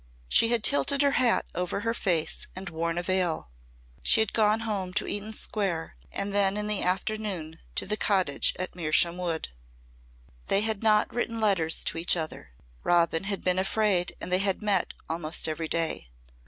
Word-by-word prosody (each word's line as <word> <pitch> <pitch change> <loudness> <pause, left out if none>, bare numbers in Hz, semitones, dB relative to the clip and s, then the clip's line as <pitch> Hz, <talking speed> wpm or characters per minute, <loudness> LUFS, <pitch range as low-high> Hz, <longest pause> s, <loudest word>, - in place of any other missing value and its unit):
She 230 - +4
had 230 -2 +1
tilted 280 +1 +3
her 280 - +3
hat 240 -2 +3
over 180 +2 -2
her 230 +1 -1
face 170 -8 -1
and 185 -1 -6
worn 165 +1 -2
a 175 - -1
veil. 180 - -1 0.5
She - - +4
had 220 -1 +1
gone 215 0 +3
home 200 -4 -3
to 210 - +1
Eaton 205 +1 -2
Square 195 - -3 0.2
and 200 0 -3
then 200 0 +3
in 210 - -1
the 210 -1 +1
afternoon 185 -4 -2 0.2
to - - +2
the 210 +2 -1
cottage 185 -10 +2
at 185 0 -4
Mersham 170 0 +2
Wood. 170 -3 -3 1.0
They 195 - +3
had 220 -2 -1
not 215 -1 +3
written 230 -1 -2
letters 190 -7 +2
to - - -1
each 175 +1 +2
other. 155 - -5 0.3
Robin 170 0 +2
had 200 -1 -3
been 185 0 +1
afraid 195 -2 +1
and - - -6
they 185 - +4
had 195 +1 0
met 200 -3 +1
almost 160 0 +1
every 160 +1 -3
day. 160 - -2
190 Hz, 180 wpm, -27 LUFS, 170-210 Hz, 1.0 s, She